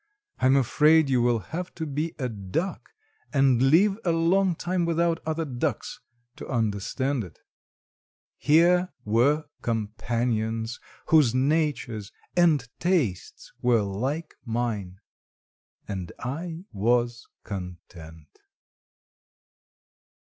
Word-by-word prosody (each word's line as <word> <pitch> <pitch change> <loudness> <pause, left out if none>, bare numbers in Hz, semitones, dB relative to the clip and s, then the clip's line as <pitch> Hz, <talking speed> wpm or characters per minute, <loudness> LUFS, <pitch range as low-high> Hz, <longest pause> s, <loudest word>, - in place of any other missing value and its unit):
I - - +3
am 130 - +5
afraid 150 +3 +4
you 125 -2 +3
will 120 -1 +3 0.2
have 180 +2 -4
to 160 - -4
be 150 +3 -3
a 130 - -2
duck, 110 - -4 0.4
and 135 -4 +3
live 190 +10 +4
a 175 - +2
long 175 +3 +2
time 175 +2 -1
without 170 0 +1
other 160 +1 -1
ducks, 125 -4 -3 0.4
to - - -8
understand 120 +3 -1
it. 90 -5 -12 1.0
Here 175 +4 +4 0.2
were 125 +8 +2 0.2
companions, 115 0 -2 0.3
whose 145 -7 +5
natures 135 -7 0 0.2
and 160 -8 +3
tastes 160 - -1
were 120 -3 +3
like 130 +12 -3
mine, 110 -6 -3 0.9
and 95 -3 -5
I 165 +6 -5
was 120 +3 0 0.2
content. 85 -5 -9
130 Hz, 105 wpm, -26 LUFS, 110-160 Hz, 1.0 s, am